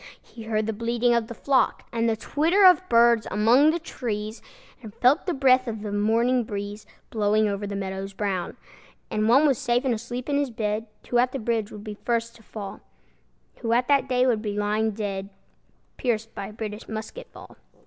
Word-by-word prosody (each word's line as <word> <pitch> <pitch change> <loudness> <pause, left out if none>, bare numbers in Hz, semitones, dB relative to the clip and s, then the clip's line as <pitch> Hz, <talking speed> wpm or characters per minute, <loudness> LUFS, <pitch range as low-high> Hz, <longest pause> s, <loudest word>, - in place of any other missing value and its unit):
He 225 -2 -13
heard 215 -1 0
the 220 - -2
bleating 235 +2 +1
of 235 -2 +1
the 235 - -8
flock, 275 +2 +1
And 230 0 +1
the 225 - +1
twitter 330 - +2
of 365 -1 +7
birds 235 -1 +4
among 235 +8 +4
the 325 - +1
trees, 220 -9 -5 0.4
And 220 -3 -11
felt 275 +9 +3
the 355 - +1
breath 260 -1 +4
of 220 -2 -5
the 210 - -4
morning 230 +4 +2
breeze 205 0 -6 0.2
Blowing 215 0 +2
over 200 0 -3
the 200 - -4
meadows 195 0 -4
brown. 190 -3 -3 0.5
And 215 +1 +1
one 270 +6 +6
was 275 -5 +2
safe 240 +2 0
and 255 - +2
asleep 240 +2 -5
in 285 -1 +1
his 285 -2 0
bed 220 -1 -2 0.2
Who 240 - +2
at 250 +1 +2
the - - -2
bridge 225 -3 -2
would 210 -1 -9
be 210 -1 -6
first 235 -1 -1
to - - -19
fall, 210 -3 -8 0.8
Who 230 - -5
that 270 +1 +1
day 250 0 +3
would 235 -4 +1
be 210 -2 -4
lying 210 +2 +1
dead, 200 -2 -4 0.7
Pierced 225 -3 -2
by 195 - -5
a 210 - -11
British 210 0 -7
musket 220 - -7
ball. - - -14
225 Hz, 200 wpm, -25 LUFS, 210-250 Hz, 0.8 s, of